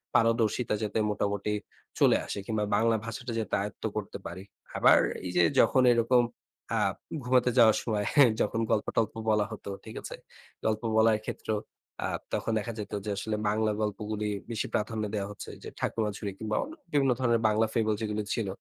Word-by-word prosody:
পারদর্শিতা 115 0 +2
যাতে 105 +1 -1
মোটামুটি 100 0 -1 0.5
চলে - - +6
আসে, - - -5
কিংবা 110 -2 -1
বাংলা 115 0 +3
ভাষাটা 120 +2 -5
যাতে 110 - -4
আয়েত্ত 105 0 -6
করতে - - -4
পারি। 90 +3 -6 0.3
আবার - - +7 0.3
এই 90 - -3
যে 90 - +6 0.2
যখন 130 - +5
এরকম 120 +1 +4 0.6
আ - - +2 0.4
ঘুমাতে 125 0 +3
যাওয়ার 110 -3 +7
সময়, 105 -3 -1
হ্যাঁ? 140 -6 +7
যখন 115 - 0
গল্প-টল্প 110 0 +1 0.2
বলা 105 -1 +3
হতো, 105 -2 -7 0.2
ঠিক - - -9
আছে? - - -7 0.5
গল্প 110 -1 +1 0.2
বলায় 110 -1 +5
ক্ষেত্রেও 110 -1 -2 0.5
আ - - 0 0.3
তখন - - -1
দেখা 115 +3 -4
যেত 105 -1 -6
যে 105 - -1
আসলে, 110 +1 -2
বাংলা 110 +1 +1
গল্পগুলি 105 0 -2 0.2
বেশি 110 - -2
প্রাধান্য 110 +1 -1
দেয়া 100 -2 -1
হচ্ছে 105 - -8
যে, - - -6
ঠাকুমাঝুরি 105 -2 -2
কিংবা 110 -1 -2
অ - - -5 0.3
বিভিন্ন 140 -3 +3
ধরনের 120 -3 +2
বাংলা 110 +1 +3
ফেবল 110 -2 +2
যেগুলি 105 -1 -1
ছিল, 110 -4 -1
110 Hz, 170 wpm, -29 LUFS, 105-115 Hz, 0.6 s, আবার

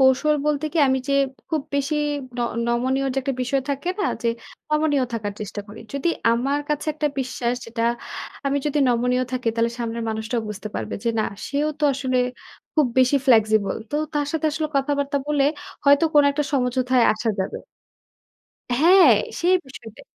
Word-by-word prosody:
কৌশল 265 +3 +4
বলতে 300 0 0
কি 335 - -1
আমি 265 - +2
যে - - +2 0.4
খুব 315 -3 -1
বেশি 280 +2 0 0.4
ন - - 0 0.3
নমনীয় 260 +3 +1
যে - - +1
একটা 270 +1 -2
বিষয় 265 +2 0
থাকে 280 +5 -3
না - - +1 0.2
যে 235 - +1 0.4
নমনীয় 300 -3 +2
থাকার 210 -3 -3
চেষ্টা 210 0 -5
করি। 215 +2 -10
যদি 280 +4 -1 0.2
আমার 270 +5 0
কাছে 300 +1 -1
একটা 300 -1 0
বিশ্বাস 250 -2 -1
যেটা 230 0 -4 0.6
আমি 280 +1 +1
যদি 295 0 0
নমনীয় 250 +1 +2
থাকি 250 -2 -1
তাহলে 230 0 +1
সামনের 230 -1 -3
মানুষটাও 220 +2 -2
বুঝতে 210 0 -6
পারবে 110 -1 -3
যে - - +2
না - - +1 0.2
সেও 290 +2 0
তো 300 - 0
আসলে 260 -1 -1 0.6
খুব 305 -3 +4
বেশি 255 +2 +5
flexible 220 -4 +3
তো 295 - -1 0.2
তার 290 -1 0
সাথে 320 -1 0
আসলে 310 0 -2
কথাবার্তা 285 0 0
বলে 295 -2 +2 0.4
হয়তো 285 +3 +6
কোন 295 - +7
একটা 290 +1 -1
সমঝোতায় 250 -2 +2
আসা 220 +2 -3
যাবে। 190 - -3 1.2
হ্যাঁ, 335 - +7 0.2
সেই 360 +2 +3
বিষয়টাই। 235 -4 -12
265 Hz, 170 wpm, -23 LUFS, 235-290 Hz, 1.2 s, কোন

